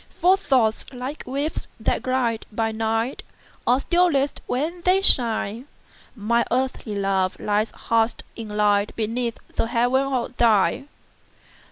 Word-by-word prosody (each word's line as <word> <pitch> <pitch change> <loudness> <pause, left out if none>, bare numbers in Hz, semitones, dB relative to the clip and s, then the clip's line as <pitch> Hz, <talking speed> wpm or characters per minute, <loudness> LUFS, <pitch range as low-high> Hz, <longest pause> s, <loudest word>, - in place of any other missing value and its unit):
For 365 +2 +5
thoughts, 255 - +1
like 260 +3 -6
waves 285 +4 -3
that 220 - 0
glide 250 -3 -1
by 225 +1 -1
night, 225 +3 -2 0.5
Are 250 +3 +3
stillest 335 -6 +1
when 320 +7 -2
they 365 +2 +3
shine; 230 - +4 0.5
Mine 235 +2 +1
earthly 250 -3 -2
love 195 -2 0
lies 210 +1 0
hush'd 230 0 -1
in 225 -2 -7
lightBeneath 210 +3 0 0.2
the - - +1
heaven 245 +2 +2
of 250 -1 -2
thine. 230 +4 +2
235 Hz, 125 wpm, -23 LUFS, 220-265 Hz, 0.5 s, For